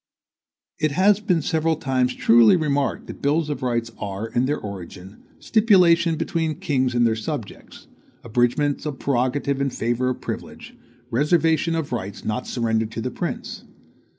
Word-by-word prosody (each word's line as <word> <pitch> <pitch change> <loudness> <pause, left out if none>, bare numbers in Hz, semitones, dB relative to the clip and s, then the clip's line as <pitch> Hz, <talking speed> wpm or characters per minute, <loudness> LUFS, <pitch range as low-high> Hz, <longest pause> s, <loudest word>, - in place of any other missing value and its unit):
It 155 -2 +1
has 195 +5 +4
been 180 -7 0
several 160 +2 +1
times 130 -3 0
truly 115 +3 +6
remarked 145 -4 -1
that - - -10
bills 150 +2 +1
of 145 - -4
rights 120 -2 -1
are, 100 +2 -4
in 120 +3 0
their 145 +2 0
origin, 95 -1 -9 0.2
stipulations 175 -7 +4
between 165 -2 -1
kings 130 -4 -1
and 120 0 +3
their 115 -1 +2
subjects, 115 0 -7 0.4
abridgements 125 +6 0
of 145 -3 -4
prerogative 135 +2 0
in 140 - +1
favor 120 +1 -1
of 130 - -3
privilege, - - -7 0.4
reservations 160 +4 +2
of 160 -3 -3
rights 100 -5 -5
not 110 +3 -2
surrendered 110 -2 -1
to 115 - -4
the 125 - -3
prince. - - -5
135 Hz, 150 wpm, -23 LUFS, 120-160 Hz, 0.4 s, truly